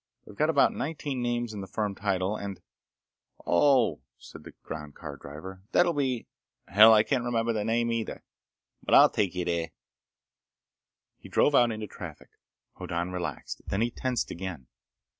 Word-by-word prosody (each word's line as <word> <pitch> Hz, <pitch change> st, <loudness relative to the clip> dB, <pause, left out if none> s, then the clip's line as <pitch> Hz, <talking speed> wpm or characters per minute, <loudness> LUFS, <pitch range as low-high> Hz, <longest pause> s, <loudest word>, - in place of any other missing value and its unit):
They've 105 Hz, -, -13 dB
got 155 Hz, +6 st, +1 dB
about 140 Hz, -4 st, +4 dB
nineteen 145 Hz, -4 st, -3 dB
names 120 Hz, -1 st, -1 dB
in 105 Hz, -, -5 dB
the 95 Hz, -, -7 dB
firm 105 Hz, -1 st, -2 dB
title 100 Hz, 0 st, -1 dB
and—" 100 Hz, -2 st, -6 dB, 0.9 s
"Oh!" 115 Hz, -, +3 dB, 0.2 s
said -, -, -13 dB
the -, -, -12 dB
ground 75 Hz, -2 st, -7 dB
car 75 Hz, -4 st, -8 dB
driver. 80 Hz, +8 st, -10 dB
"That'll 175 Hz, -1 st, +4 dB
be— 130 Hz, -5 st, -1 dB, 0.4 s
Hell! 105 Hz, +4 st, +8 dB
I 105 Hz, -1 st, +6 dB
can't 130 Hz, 0 st, 0 dB
remember 115 Hz, -1 st, 0 dB
the 105 Hz, -2 st, -1 dB
name 115 Hz, +2 st, +1 dB
either. 115 Hz, -1 st, -3 dB, 0.6 s
But -, -, +2 dB
I'll -, -, +8 dB
take 95 Hz, -3 st, 0 dB
you 90 Hz, -1 st, -2 dB
there." 85 Hz, -1 st, -1 dB, 1.5 s
He -, -, -13 dB
drove 145 Hz, -, +3 dB
out 120 Hz, -3 st, +5 dB
into 110 Hz, -1 st, -4 dB
traffic. -, -, -10 dB, 0.5 s
Hoddan 85 Hz, +2 st, -3 dB
relaxed. 85 Hz, -6 st, -5 dB
Then 95 Hz, -, -1 dB
he 120 Hz, +1 st, +1 dB
tensed 125 Hz, 0 st, -2 dB
again. 90 Hz, -7 st, -6 dB
105 Hz, 160 wpm, -28 LUFS, 90-120 Hz, 1.5 s, Hell